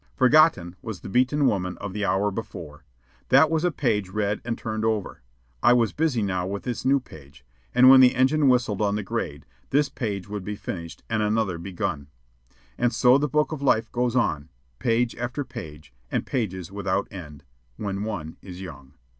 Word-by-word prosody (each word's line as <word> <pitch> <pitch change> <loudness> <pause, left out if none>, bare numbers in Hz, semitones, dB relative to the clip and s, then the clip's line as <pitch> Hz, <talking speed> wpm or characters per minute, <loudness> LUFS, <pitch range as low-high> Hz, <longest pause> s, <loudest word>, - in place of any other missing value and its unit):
Forgotten 130 - +4
was 110 -7 -7
the - - -8
beaten 130 +7 +2
woman 90 -6 0
of 100 -2 -6
the 105 0 -3
hour 100 +2 +1
before. 80 -8 -8 0.5
That 140 +4 +6
was 160 0 +1
a 180 - +3
page 110 - -1
read 105 +1 -1
and 115 -1 -3
turned 110 -1 -4
over; 110 - -1 0.4
I 120 - +6
was 120 -3 +2
busy 150 -8 0
now 90 -2 -1
with 100 +1 -4
this 125 -2 -4
new 135 +2 +3
page, 70 - -15 0.3
and 125 +1 +7
when 130 0 +9
the 130 -1 +6
engine 140 +3 +3
whistled 120 -5 +1
on 100 -1 +1
the 105 - -2
grade, 95 - -4 0.2
this 145 +1 +2
page 100 -6 -4
would 105 -1 -5
be 105 +2 -4
finished 85 -4 -7
and 115 -1 0
another 105 -4 0
begun; 90 -5 -4 0.7
and 120 -1 +2
so 125 +3 +5
the 150 0 0
book 150 +4 +1
of 155 -3 -5
life 120 -5 +2
goes 125 0 0
on, 80 - 0 0.3
page 115 +1 +1
after 120 +4 -3
page 75 - -10 0.2
and - - -1
pages 95 -7 -3
without 100 -1 -1
end 75 -7 -10 0.3
when 100 -1 -3
one 85 -8 -5
is 90 -2 -10
young. 70 -6 -10
105 Hz, 190 wpm, -25 LUFS, 95-125 Hz, 0.7 s, when